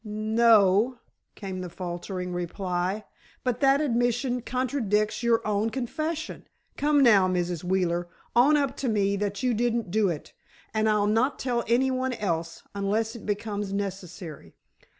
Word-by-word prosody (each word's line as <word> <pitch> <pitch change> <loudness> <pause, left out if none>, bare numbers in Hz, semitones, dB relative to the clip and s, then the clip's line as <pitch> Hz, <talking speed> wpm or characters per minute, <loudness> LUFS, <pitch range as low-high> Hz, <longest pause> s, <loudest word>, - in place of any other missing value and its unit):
"N—no," 215 +1 +3 0.4
came 190 -3 -5
the 180 - -5
faltering 180 +1 -5
reply. 180 +3 -2 0.4
"But 250 -3 -1
that 275 +1 +4
admission 245 -1 0
contradicts 240 -5 0
your 235 -1 +2
own 210 +1 +1
confession. 310 +6 -4 0.3
Come 290 -1 +3
now, 205 -7 +6
Mrs. 175 -2 -1
Wheeler, 175 -1 0 0.3
own 280 +6 +6
up 280 -2 0
to 260 - -1
me 200 -2 +1
that 200 +2 -3
you 250 -1 +2
didn't 230 -3 0
do 210 -1 +2
it, 155 -4 -5 0.4
and 220 0 +2
I'll 210 -1 +3
not 225 +6 +2
tell 240 -2 -1
any 260 +3 +3
one 255 0 -1
else, 165 -6 -3
unless 210 +3 -1
it 235 - -10
becomes 205 -1 -2
necessary." 185 - -6
215 Hz, 145 wpm, -27 LUFS, 190-245 Hz, 0.4 s, now